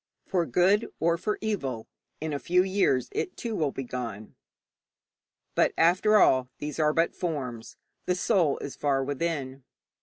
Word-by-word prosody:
For 175 -3 0
good 190 - +2
or 165 +1 +2
for 210 +5 -2
evil, 140 - -3 0.3
in 155 0 -3
a 140 - -2
few 180 +4 +3
years 190 -10 +1
it, 360 - -3
too, 230 -2 -4
will 155 -6 +1
be 135 - -5
gone. 115 -4 -6 1.2
But, - - +2
after 185 +6 +4
all, 130 -9 +4
these 150 +1 -5
are 150 -1 +4
but 165 +2 +1
forms; 130 -9 -4 0.3
the 180 - +2
soul 180 -6 +2
is 140 - -7
far 140 -2 +1
within. 140 -2 -3
155 Hz, 155 wpm, -27 LUFS, 135-180 Hz, 1.2 s, after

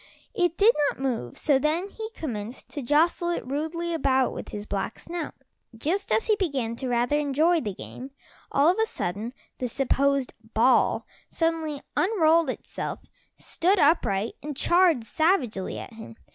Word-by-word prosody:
It 350 -6 +1
did 440 +4 +6 0.2
not - - -7
move, 240 - -2
so 285 -3 +3
then 320 +7 0
he 440 +1 -6
commenced 235 -5 -6
to 290 - -5
jostle 320 +6 +2
it 345 - -2
rudely 320 +5 -2
about 265 -5 +2
with - - -7
his 205 0 -6
black 200 +2 -3
snout. 340 -2 -6 0.4
Just 355 - -1
as 450 - +2
he - - +1
was 415 - -1
beginning 245 -6 -2
to 260 0 -3
rather 245 +4 +2
enjoy 310 +4 +2
the 205 -6 -4
game, 255 +7 -9 0.4
all 280 +2 +4
of 370 - +1
a 445 - +2
sudden 205 - -3 0.3
the 250 - -1
supposed 275 +1 +1 0.2
ball 245 +4 +3 0.2
suddenly 325 -3 -1
unrolled 335 -6 +3
itself, - - -5 0.4
stood 370 +5 +1
upright 230 - +2
and 295 -2 -6
charged 345 -8 +4
savagely 250 - 0
at - - -8
him. 225 0 -10
290 Hz, 160 wpm, -26 LUFS, 245-340 Hz, 0.4 s, did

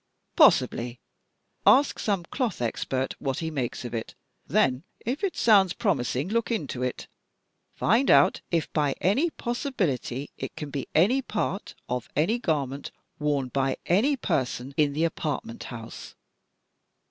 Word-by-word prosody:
"Possibly. 120 +1 +4 0.6
Ask 275 +2 +5
some 200 -5 0
cloth 240 - -2
expert 130 +2 -1
what 135 -2 -2
he 160 -1 -3
makes 130 -4 -3
of 120 - -6
it, 115 -1 -4 0.3
then 125 0 +2 0.2
if 260 - -2
it 390 - -1
sounds 195 -5 +5
promising, 140 - 0
look 230 +3 0
into 150 - -2
it. 125 0 -3 0.7
Find 235 +7 +2
out - - +5
if 165 -2 -1
by 145 -3 +1
any 255 - +2
possibility 180 - -2
it - - -5
can 150 -2 -6
be 140 -1 -4
any 210 +12 +4
part 210 -5 -3
of 125 -2 -3
any 190 +11 +2
garment 140 - -1 0.3
worn 145 -3 0
by 135 +1 0
any 240 +11 +3
person 130 - -2
in 145 -1 +2
the 155 +3 0
apartment 150 -7 -3
house." 115 -2 -9
155 Hz, 140 wpm, -26 LUFS, 130-215 Hz, 0.7 s, Ask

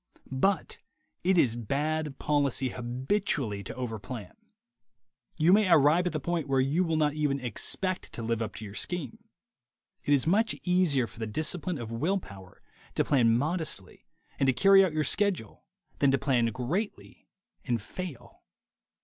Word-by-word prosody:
But 190 +10 0 0.4
it 185 +1 +3
is 120 -8 +3
bad 145 +4 -2
policy 140 -3 +1
habitually 125 - -1
to - - -6
overplan. 115 -4 -6 1.1
You 165 +4 +5
may 205 -2 +4
arrive 160 +3 +5
at - - -1
the 155 - -1
point 165 0 -2
where 135 -1 +2
you 140 +7 +2
will 165 -2 0
not 150 -2 +2
even 150 -2 0
expect 185 +9 -2
to 115 - -5
live 115 0 -1
up 110 - -4
to 110 - -7
your 100 - -9
scheme. 175 - -3 0.8
It 145 - +4
is 135 - +1
much 210 +6 +2
easier 180 -8 +2
for 115 - -14
the 110 - -3
discipline 155 +8 -1
of 115 -3 -6
will 160 +13 0
power 95 - -12 0.3
to - - +2
plan 115 -5 +4
modestly 155 - -2 0.3
and 135 - +2
to 130 - +4
carry 195 +5 +6
out 185 - +1
your 155 0 +1
schedule 180 - -1 0.3
than 140 - +4
to 135 - +3
plan 125 -4 +1
greatly 130 - -4 0.4
and 120 -3 -1
fail. 125 - -8
140 Hz, 160 wpm, -28 LUFS, 120-175 Hz, 1.1 s, carry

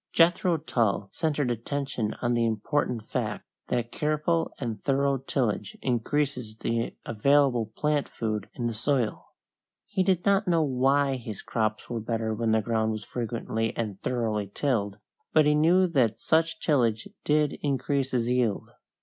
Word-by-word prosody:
Jethro 170 +1 +4
Tull 115 -9 0
centered 150 -5 0
attention 120 -1 -2
on 120 0 +2
the 120 -1 +2
important 115 +1 -1
fact 110 -4 -3 0.2
that 120 -1 -1
careful 155 +2 0
and 115 -5 -4
thorough 140 0 +1
tillage 120 -6 -2
increases 125 -2 -1
the 115 +1 -2
available 125 0 +3
plant 150 -1 0
food 105 -3 -3
in 120 - -3
the 120 - 0
soil. 120 0 -1 0.6
He 200 -2 -1
did 185 -2 +1
not 200 0 +3
know 165 -2 +3
why 135 0 +2
his 110 -5 -7
crops 110 -2 -1
were 120 -2 -3
better 110 0 -1
when 115 +1 -1
the 110 -1 +3
ground 110 -1 0
was 110 -1 -6
frequently 115 -1 -3
and 105 -4 -3
thoroughly 110 -5 -1
tilled, 105 -7 -1 0.4
but 155 -1 +6
he 150 - +4
knew 170 +5 +4
that 120 -8 +2
such 165 +4 +1
tillage 115 -7 +1 0.2
did 150 -1 +1
increase 140 -1 0
his 120 -3 0
yield. 125 -4 0
125 Hz, 150 wpm, -27 LUFS, 110-145 Hz, 0.6 s, but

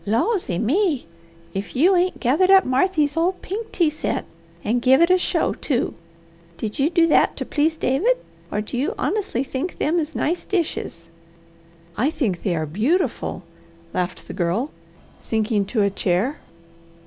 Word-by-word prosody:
Lawsy 230 - 0
me! 300 - +1 0.5
if 195 +1 -5
you 350 +9 +5
ain't 365 +1 +1
gathered 295 +10 +3
up 385 -1 +7
Marthy's 290 +2 +2
old 350 +3 +1
pink 430 +4 -5
tea 335 -4 +2
set, 310 - -2 0.4
and 240 +3 +1
give 265 +2 +5
it 340 +2 +5
a 370 - +6
show, - - 0
too! 255 -5 -1 0.6
Did 215 +2 -4
you 280 +3 +3
do 335 -1 +4
that 330 - +3
to - - -3
please 315 +2 +1
David, 360 - +2 0.3
or 210 - 0
do 230 +3 -4
you 325 - -1
honestly 385 - -1
think 270 +6 -4
them 325 +4 +1
is 310 0 -4
nice 340 +4 -1
dishes?" 315 - -3 0.9
"I 255 - +2
think 230 - -1
they 180 -4 0
are 155 -1 -1
beautiful," 230 - -1 0.5
laughed 180 -1 -3
the - - -6
Girl, 190 - -1 0.5
sinking 215 -2 0
to 210 +1 0
a 200 - +2
chair. 200 - 0
280 Hz, 160 wpm, -22 LUFS, 215-350 Hz, 0.9 s, up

